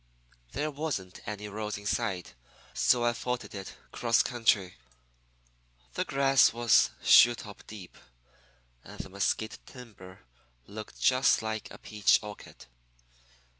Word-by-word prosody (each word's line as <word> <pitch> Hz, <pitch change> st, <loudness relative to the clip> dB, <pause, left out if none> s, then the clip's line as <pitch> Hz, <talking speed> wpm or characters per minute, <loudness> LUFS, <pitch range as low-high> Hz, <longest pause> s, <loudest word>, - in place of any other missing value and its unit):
"There 155 Hz, +1 st, -2 dB
wasn't 135 Hz, -12 st, -5 dB
any 105 Hz, 0 st, -5 dB
roads 105 Hz, 0 st, -5 dB
in 100 Hz, -, -12 dB
sight, 100 Hz, -4 st, -2 dB, 0.4 s
so 120 Hz, -1 st, +2 dB
I 120 Hz, -, +2 dB
footed 125 Hz, +1 st, -4 dB
it 95 Hz, -1 st, -8 dB, 0.2 s
'cross 115 Hz, -1 st, +2 dB
country. 105 Hz, -, 0 dB, 1.2 s
The -, -, -2 dB
grass 135 Hz, 0 st, +4 dB
was 120 Hz, -1 st, +4 dB
shoe 120 Hz, 0 st, +7 dB
top 105 Hz, -3 st, -11 dB
deep, 100 Hz, -5 st, -11 dB, 0.9 s
and -, -, -12 dB
the -, -, -6 dB
mesquite 100 Hz, +3 st, -2 dB
timber 105 Hz, -8 st, -13 dB, 0.4 s
looked 105 Hz, -, -10 dB
just 130 Hz, -2 st, +3 dB
like 110 Hz, 0 st, -4 dB
a -, -, -11 dB
peach 105 Hz, -3 st, +2 dB
orchard. 105 Hz, -1 st, -11 dB
110 Hz, 125 wpm, -29 LUFS, 100-120 Hz, 1.2 s, shoe